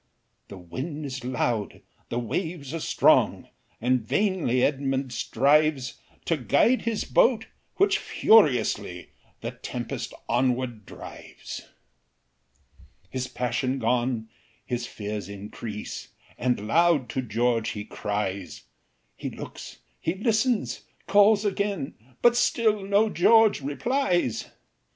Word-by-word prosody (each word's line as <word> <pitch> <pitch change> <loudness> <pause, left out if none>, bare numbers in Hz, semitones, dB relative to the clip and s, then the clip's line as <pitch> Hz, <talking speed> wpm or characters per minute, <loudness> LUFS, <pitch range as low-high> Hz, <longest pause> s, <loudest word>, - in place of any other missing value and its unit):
The 100 - -10
wind 135 - -6
is 130 -2 -5
loud, 120 -4 -2 0.3
the 120 - -2
waves 145 - -3
are 165 - -2
strong, - - +3 0.3
And 125 +1 +2
vainly 160 - +1
Edmund 135 -2 0
strives 140 +2 +2 0.3
To 165 - +1
guide 150 - +3
his 230 -2 -1
boat, - - +3 0.3
which 400 +1 +3
furiously 150 - +3 0.3
The - - -4
tempest - - -5
onward 120 -3 0
drives. - - -9 1.4
His 130 -1 -3
passion 125 +2 -1
gone, 120 -1 0 0.4
his 120 -1 -3
fears 105 -3 -5
increase, 105 +1 -7 0.3
And 125 -4 -1
loud 165 -1 +3
to 130 - -1
George 115 0 0
he 105 -1 -6
cries; 100 -3 -4 0.5
He - - -5
looks - - -9 0.2
he 165 - -1
listens 225 +3 +1 0.2
calls 205 +1 +5
again, 200 -7 -1 0.3
But 240 0 +6
still 220 -4 +2
no 200 +3 +3
George 220 +1 +5
replies. 175 - 0
130 Hz, 110 wpm, -26 LUFS, 120-195 Hz, 1.4 s, But